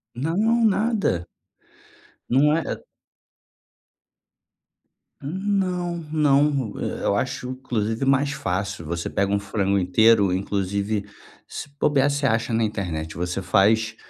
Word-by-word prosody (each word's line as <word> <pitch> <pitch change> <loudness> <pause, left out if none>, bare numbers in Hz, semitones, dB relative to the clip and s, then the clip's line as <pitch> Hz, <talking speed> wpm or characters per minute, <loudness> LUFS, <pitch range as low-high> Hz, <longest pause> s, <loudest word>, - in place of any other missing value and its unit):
Não, 205 - +1
nada. 205 - +1 1.0
Não 150 +4 +4
é. 165 - 0
É - - -10 2.4
Não, 180 +1 -1
não. 140 -5 +2
Eh, - - -4
eu 100 - +2
acho 130 +3 -2
inclusive 120 -2 -2
mais 140 +1 +2
fácil, 95 - -3
você 85 +1 -3
pega 100 0 0
um 100 - +2
frango 100 0 0
inteiro, 100 +1 +4
inclusive, 100 +2 -1 0.4
se - - -7
bobiar, 140 -1 +3
você 140 0 -1
acha 115 -2 +1
na 115 - +2
internet, 90 -7 -3
você 90 +2 -3
faz 110 +4 +2
115 Hz, 115 wpm, -23 LUFS, 100-145 Hz, 2.4 s, Não